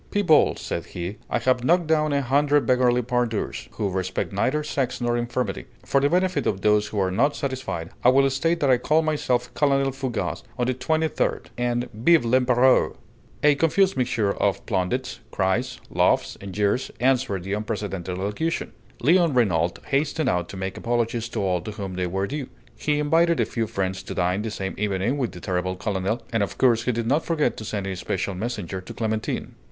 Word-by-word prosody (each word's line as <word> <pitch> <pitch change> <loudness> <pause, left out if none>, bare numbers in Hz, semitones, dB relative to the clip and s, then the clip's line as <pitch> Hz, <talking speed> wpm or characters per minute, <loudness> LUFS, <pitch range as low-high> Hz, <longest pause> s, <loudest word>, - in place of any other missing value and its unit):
"People," 175 -7 +4
said - - -4
he, 90 +5 -5
"I - - +1
have 130 -1 +1
knocked 175 +5 +3
down 155 -1 +2
a 140 -1 +1
hundred 145 +3 +3
beggarly 125 -1 +3
pandours, 120 -2 -2
who 105 - -1
respect 95 +1 -2
neither 135 +10 +1
sex 130 -3 -2
nor 120 -1 0
infirmity. 120 -3 -2 0.2
For 140 - +2
the 140 - +3
benefit 185 +2 +1
of 95 -2 -1
those 105 0 +3
who 105 - -6
are 95 -1 +1
not 140 +10 +2
satisfied, 130 - -4
I 125 - +7
will 135 +1 +5
state 165 +6 0
that 140 - +3
I 125 - +5
call 155 +5 +2
myself 130 -6 0
Colonel 140 -2 +2
Fougas 130 -3 -3 0.2
of 125 - +1
the 130 - +1
Twenty 155 +6 0
third. - - -2
And 120 0 -1
Vive 120 +6 +4
l'Empéreur!" 125 +1 +3 0.5
A 150 0 +6
confused 175 +6 +2
mixture 125 -5 +1
of 100 -2 -1
plaudits, 110 +8 -1
cries, 110 +7 -1
laughs, - - +2
and 100 0 -7
jeers 105 +6 0
answered 125 -7 +1
this 95 +2 -2
unprecedented 100 -4 -4
allocution. 105 - -2 0.3
Léon 165 0 +4
Renault 90 -8 +2
hastened 145 +1 0
out 90 -1 -1
to 95 - -7
make 95 0 -4
apologies 120 -1 -1
to - - -3
all 90 -2 +1
to 105 +4 -6
whom 100 -2 -5
they 90 0 -1
were 95 +2 -1
due. 140 +2 -4 0.3
He 150 +5 0
invited 165 +3 +3
a - - +3
few 115 -2 -2
friends 95 -2 -2
to - - -7
dine 90 +3 +1
the 110 - -3
same 95 -2 -4
evening 105 +6 0
with 125 -4 -1
the 90 - -10
terrible 90 +1 -2
colonel, 100 +3 -2
and 115 - +2
of 100 - -2
course 120 -3 +3
he 125 - +2
did 115 -1 -2
not 145 +7 +2
forget 160 -3 0
to - - -6
send 105 -2 -3
a 95 -1 -3
special 95 +2 -2
messenger 95 -3 -4
to 95 - -10
Clémentine. 110 -1 -2
120 Hz, 195 wpm, -24 LUFS, 100-140 Hz, 0.5 s, I